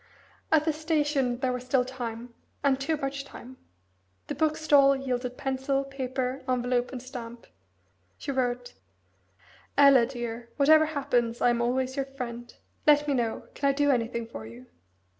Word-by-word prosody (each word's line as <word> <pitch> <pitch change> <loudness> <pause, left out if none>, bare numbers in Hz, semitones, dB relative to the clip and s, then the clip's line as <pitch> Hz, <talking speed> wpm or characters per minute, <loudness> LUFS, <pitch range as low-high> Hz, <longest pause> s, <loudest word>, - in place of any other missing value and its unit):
At 310 -1 +4
the 315 - +2
station 295 -5 0
there 255 -2 +1
was 250 0 -4
still 255 0 +2
time, 240 -2 -6 0.3
and 270 -1 +2
too 310 +3 0
much 275 0 -3
time. 260 -2 -12 0.7
The - - -1
bookstall 300 -3 +4
yielded 250 -2 -3
pencil, 270 +1 -1
paper, 260 -1 -3
envelope, 245 0 0
and 260 - -5
stamp. 240 -2 -9 0.7
She - - -4
wrote 245 -2 -2 1.0
"Ella, 275 -4 +7
dear, 240 -2 -6
whatever 310 +2 +6
happens, 245 -6 0
I 245 - +4
am 235 0 0
always 255 +2 0
your 275 - 0
friend. 240 -3 -7 0.4
Let 295 0 +5
me 285 - +2
know 235 -4 -1
can 280 - +1
I - - +3
do 285 +1 +3
anything 235 -2 -1
for 110 - -9
you? 120 +3 -12
260 Hz, 155 wpm, -27 LUFS, 245-280 Hz, 1.0 s, Ella